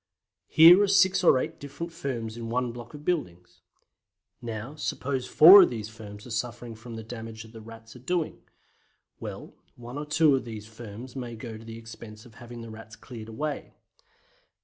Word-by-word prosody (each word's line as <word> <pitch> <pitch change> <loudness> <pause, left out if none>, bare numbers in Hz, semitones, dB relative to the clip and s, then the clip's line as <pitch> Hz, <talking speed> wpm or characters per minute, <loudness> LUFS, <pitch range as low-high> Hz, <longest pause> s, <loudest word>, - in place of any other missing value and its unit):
Here 170 +4 +8
are 205 - +3
six 190 -1 +4
or 155 - +6
eight - - -3
different 145 +4 -7
firms 120 -9 -4
in 115 -1 -6
one 125 +1 -1
block 120 +3 -10
of 150 0 -11
buildings. 90 - -3 0.8
Now, 115 +3 -6
suppose 140 -3 -3
four 185 +6 +10
of - - +5
these 110 -3 -5
firms 105 -2 -11
are 125 - -10
suffering 120 +1 -4
from 115 +1 -10
the 110 - -7
damage 110 -1 -8
the 110 0 -12
Rats 115 +1 -13
are - - -11
doing. 170 +5 -2 0.8
Well, - - -8 0.2
one 120 +3 -8
or 150 - -6
two 150 -1 +4
of 130 - -2
these 110 -3 -8
firms 115 +3 -10
may 120 -3 -5
go 115 0 -8
to 110 - -11
the 115 0 -9
expense 115 -1 -11
of 120 - -16
having 120 0 -9
the 115 -1 -9
Rats 110 0 -11
cleared 115 -4 -10
away. 145 +6 -5
120 Hz, 185 wpm, -27 LUFS, 110-140 Hz, 0.8 s, four